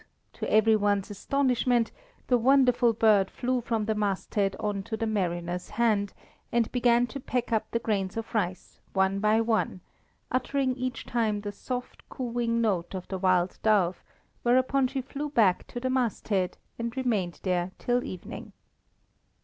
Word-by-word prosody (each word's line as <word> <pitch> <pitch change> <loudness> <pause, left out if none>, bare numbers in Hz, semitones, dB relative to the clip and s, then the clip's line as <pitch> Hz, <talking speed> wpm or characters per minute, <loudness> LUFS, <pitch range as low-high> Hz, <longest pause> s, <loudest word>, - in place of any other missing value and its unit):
to - - -4
every 220 +1 +5
one's 205 -1 +1
astonishment, 250 +1 +1 0.3
the 250 - +3
wonderful 250 -1 +4
bird 215 -3 +4
flew 250 0 -1
from 225 -2 -1
the 220 - +1
masthead 200 -1 -1
on 205 -2 -1
to 220 +3 -5
the 225 - -1
mariner's 180 -4 -2
hand, 210 -4 +1 0.4
and 235 -1 +1
began 240 -1 +3
to 275 +3 -7
peck 250 -2 -2
up 220 -1 0
the - - 0
grains 205 -4 -1
of 225 0 -5
rice 185 -5 -2
one 190 0 +2
by 215 +2 +3
one, 225 -4 0 0.5
uttering 260 +1 0
each 255 -1 -4
time 220 -3 0
the 205 0 -4
soft 250 +4 -6
cooing 235 -2 -1
note 195 -6 0
of 185 - -6
the 190 - -3
wild 185 -1 +2
dove, 195 -5 +2 0.4
whereupon 255 +2 +3
she 270 +1 -3
flew 285 +3 -5
back 210 -10 +3
to 245 - -6
the 260 - -2
masthead, 215 -7 0 0.2
and 235 +2 -4
remained 210 -9 -1
there 180 -1 0
till 245 0 0
evening. 185 - -8
225 Hz, 155 wpm, -28 LUFS, 195-245 Hz, 0.5 s, every